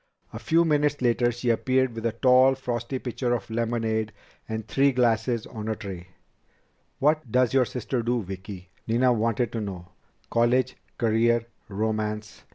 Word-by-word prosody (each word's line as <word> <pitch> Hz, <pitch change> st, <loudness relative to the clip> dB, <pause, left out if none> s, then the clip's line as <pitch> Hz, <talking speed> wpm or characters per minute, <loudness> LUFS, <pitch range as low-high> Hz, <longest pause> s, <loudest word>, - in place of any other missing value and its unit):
A -, -, -6 dB
few 165 Hz, +1 st, +3 dB
minutes 150 Hz, -2 st, +2 dB
later 120 Hz, 0 st, +2 dB
she 120 Hz, +1 st, -3 dB
reappeared 130 Hz, +2 st, +2 dB
with 115 Hz, 0 st, -2 dB
a -, -, 0 dB
tall, 130 Hz, +2 st, +5 dB
frosty 125 Hz, 0 st, -3 dB
pitcher 125 Hz, -1 st, -1 dB
of 115 Hz, -1 st, -6 dB
lemonade 110 Hz, -1 st, -1 dB, 0.4 s
and 110 Hz, 0 st, -4 dB
three 140 Hz, +1 st, +3 dB
glasses 115 Hz, -2 st, +1 dB
on 110 Hz, -2 st, -7 dB
a 110 Hz, -, -1 dB
tray. 95 Hz, -5 st, -8 dB, 0.9 s
"What 150 Hz, -3 st, +1 dB
does 125 Hz, 0 st, +3 dB
your 130 Hz, -2 st, +4 dB
sister 125 Hz, +1 st, -3 dB
do, 120 Hz, 0 st, 0 dB
Vicki?" 95 Hz, 0 st, -8 dB, 0.2 s
Nina 125 Hz, +2 st, +3 dB
wanted 115 Hz, +1 st, 0 dB
to 115 Hz, -, -3 dB
know. 90 Hz, -4 st, -6 dB, 0.4 s
"College? 120 Hz, +2 st, +2 dB, 0.2 s
Career? 115 Hz, 0 st, +2 dB, 0.2 s
Romance?" 105 Hz, 0 st, -3 dB
115 Hz, 155 wpm, -26 LUFS, 110-125 Hz, 0.9 s, tall